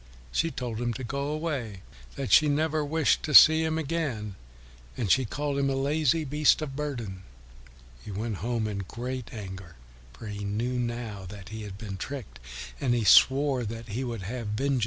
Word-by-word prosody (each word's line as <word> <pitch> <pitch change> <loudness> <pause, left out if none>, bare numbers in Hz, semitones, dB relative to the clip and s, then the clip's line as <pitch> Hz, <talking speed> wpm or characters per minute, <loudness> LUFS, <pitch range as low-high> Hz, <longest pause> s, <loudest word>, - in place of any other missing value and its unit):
She 165 - +1
told 120 -6 -4
him 120 -1 0
to 130 - -5
go 140 +3 -3
away, 145 - -3 0.3
that 135 - -4
she 155 -1 +7
never 155 +1 +1
wished 150 0 +2
to 150 -3 -1
see 160 +1 +9
him 160 0 0
again, 145 -10 -2 0.6
and 105 -7 0
she 130 -1 +4
called 145 +4 -2
him 140 0 +2
a 135 - 0
lazy 150 +3 +1
beast 150 +2 +3
of 135 -3 -6
burden. 120 -10 -4 0.8
He - - -9
went 105 +1 -3
home 115 +3 -1
in 100 -2 -3
great 120 +5 -5
anger, 95 -5 -8 0.4
for 65 - -11
he 105 -1 -5
knew 115 +5 -1
now 120 -5 -4
that 95 0 -10
he 110 0 -6
had 100 -2 -7
been 100 -3 -6
tricked, 105 - -7 0.4
and 125 -3 +1
he 120 - 0
swore 135 +3 +5
that 115 +1 -6
he 115 +6 -3
would 115 -6 -4
have 115 +3 -5
vengeance 105 +1 -3
on 140 +1 +1
Rabbit. 135 - +2
120 Hz, 195 wpm, -28 LUFS, 105-145 Hz, 0.8 s, see